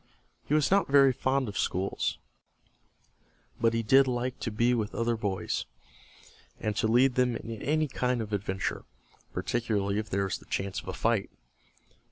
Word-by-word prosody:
He 150 - +2
was 155 +1 +2
not 200 0 +4
very 140 -1 +6
fond 130 +1 0
of 100 - -4
school, 95 +2 -1 1.6
but 115 0 +2
he 115 - 0
did 135 +5 +5
like 125 0 -2
to - - -2
be 115 +3 +2
with 110 -3 -2
other 115 0 +1
boys, 100 -4 -2 0.9
and 105 -1 -2
to - - +2
lead 125 +3 +4
them 125 -1 +2
in 115 -1 -6
any 155 +1 +1
kind 125 -2 -1
of 110 -2 -4
an - - +1
adventure, 95 -1 -3 0.5
particularly 105 -4 -1
if 110 0 -5
there 100 -1 0
was 95 - -2
the - - -18
chance 95 0 -3
of - - -18
a 95 - -3
fight. 110 -2 0
115 Hz, 175 wpm, -29 LUFS, 105-130 Hz, 1.6 s, very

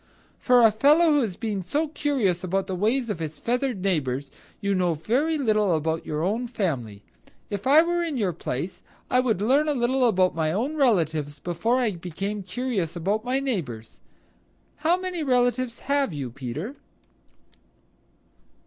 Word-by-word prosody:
For 250 -2 +5
a 225 - +7
fellow 300 +9 +4
who 290 - +4
has 210 -7 -2
been 210 -3 -3
so 290 - -1
curious 255 - 0
about 190 +1 0
the 190 - -4
ways 225 +5 0
of 185 - -4
his 155 -2 -5
feathered 245 -4 -1
neighbors, 140 -7 -1 0.3
you 200 -2 0
know 180 -3 +1
very 265 - 0
little 215 - +2
about 160 +1 -2
your 150 +1 -2
own 220 +7 -1
family. 135 - -3 0.5
If 205 +3 -3
I 300 +4 +7
were 345 0 0
in 320 -5 -2
your 195 -6 0
place 165 +2 -5 0.3
I 250 - +4
would 225 -6 +1
learn 275 +7 +3
about 240 -8 +2
my 160 -1 0
own 245 - -1
relatives 160 - +1
before 175 - 0
I 245 -4 +1
became 195 +4 -4
curious 190 -4 -3
about 200 +6 -1
my 255 +2 0
neighbors. 150 - -4 0.8
How 320 +4 +2
many 365 -2 -3
relatives 250 -3 +1
have 280 - 0
you, 135 -5 -4
Peter?" 140 - -6
210 Hz, 160 wpm, -25 LUFS, 170-260 Hz, 0.8 s, a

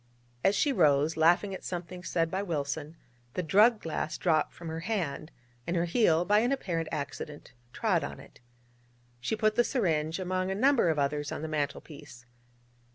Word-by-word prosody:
As 195 - +4
she 285 +4 +2
rose, 150 - +3
laughing 175 +5 +3
at 190 - -7
something 180 0 -6
said 165 -2 0
by 190 - -1
Wilson, 155 -3 -3 0.4
the 180 - -1
drug 210 +8 +5
glass 160 -2 -3
dropped 160 -3 +1
from 170 - -10
her 160 0 -4
hand, 165 -6 -3 0.4
and 170 - -1
her 170 0 +1
heel, 175 -3 +3
by 210 +3 +4
an 240 +4 +1
apparent 170 -12 -2
accident, 145 +1 -6 0.2
trod - - +1
on - - -6
it. - - -15 0.8
She 125 - -1
put 215 0 +2
the 240 +2 +3
syringe 160 - 0
among 185 0 -1
a 190 - -1
number 255 -3 +3
of 160 - +1
others 145 +1 -1
on - - -5
the - - -2
mantel 150 -2 -2
piece. 145 -5 -13
170 Hz, 180 wpm, -29 LUFS, 155-195 Hz, 0.8 s, drug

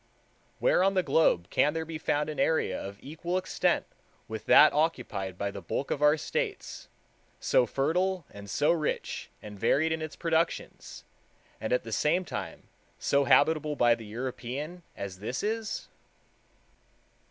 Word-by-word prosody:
Where - - +3
on 195 0 +2
the 185 - +3
globe 90 - +3
can 150 +2 +2
there 160 0 -2
be 160 -1 -6
found 150 -1 0
an 155 - -5
area 160 -1 +1
of 100 +1 -7
equal 170 +5 -3
extent 185 - 0 0.4
with 110 0 -7
that 150 - +8
occupied 125 - -1
by 100 +1 -2
the 100 - -8
bulk 115 +10 -3
of 145 - -1
our 150 +1 +5
States, 435 - -4 0.5
so - - +3
fertile 180 +5 0
and 100 0 -10
so 145 - +2
rich 160 -3 -2
and 105 -1 -9
varied 160 +9 +2
in 160 0 -1
its 155 -1 -5
productions, 165 0 -2 0.6
and 110 - -3
at 125 - +2
the 115 - -8
same 175 - +1
time 85 - -6 0.3
so 140 0 +2
habitable 150 +3 +3
by 120 -3 +5
the 115 -2 -6
European, 130 +8 -5 0.2
as 95 -2 -6
this 120 +5 -4
is? 220 0 -2
150 Hz, 155 wpm, -29 LUFS, 115-165 Hz, 0.6 s, that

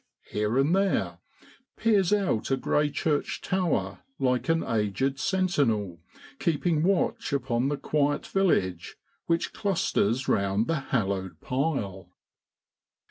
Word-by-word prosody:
here 105 +3 0
and 145 +6 +3
there, 195 0 0 0.6
peers 205 -5 +2
out 195 - +1
a 135 - +2
grey 150 +2 +1
church 145 0 -1
tower 120 - -1 0.2
like 125 -1 0
an 165 0 +2
aged 115 +5 -1
sentinel 130 - 0 0.4
keeping 160 0 +1
watch 185 +2 +1
upon 130 -2 0
the 145 0 -1
quiet 145 +1 0
village 95 - 0 0.3
which 165 0 0
clusters 135 - 0
round 100 +2 +1
the 165 +2 0
hallowed 95 - -1
pile. 105 - -2
135 Hz, 115 wpm, -27 LUFS, 105-165 Hz, 0.6 s, and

